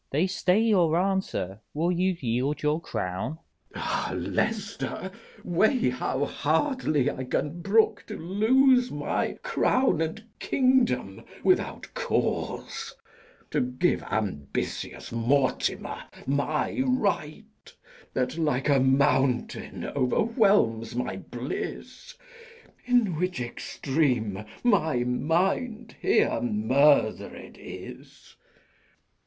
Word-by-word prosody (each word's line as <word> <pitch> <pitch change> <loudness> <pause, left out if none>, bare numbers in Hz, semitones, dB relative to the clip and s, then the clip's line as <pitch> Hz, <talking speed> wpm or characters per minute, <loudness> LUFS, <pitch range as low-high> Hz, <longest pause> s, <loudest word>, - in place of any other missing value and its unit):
They 150 +6 +2
stay 185 +1 +2
your 185 -8 +3
answer: 185 - -1 0.2
will 165 +4 +1
you 180 0 +1
yield 130 +5 -1
your 150 +2 +1
crown? 95 - -3
K. 165 - -15
Edw. - - -3
Ah, - - -1
Leicester, 205 -3 -2 0.3
weigh 215 - +2
how 130 +2 -1
hardly 155 - +1
I 130 - -5
can 150 +6 -2
brook 215 +4 +2
To - - -6
lose 250 +8 +3
my 145 0 -1
crown 255 -10 +2
and 160 +7 -3 0.2
kingdom 250 - +1 0.2
without - - +1
cause; - - -2 0.6
To - - +1
give 125 +8 0
ambitious 90 -11 -3
Mortimer 130 +4 0 0.2
my 145 - 0
right, 215 - -2 0.4
That, 130 +5 -1
like 150 -3 +1
a 140 -1 +5
mountain, 135 -1 +1
overwhelms 140 - +2
my 120 -6 -2
bliss; 130 - -6 0.7
In 240 -8 +3
which 180 -2 -1
extreme 120 -4 -1 0.2
my 160 - +2
mind 190 - 0
here 395 - +2
murder'd 150 - +2
is! - - -11
160 Hz, 100 wpm, -27 LUFS, 130-210 Hz, 0.7 s, a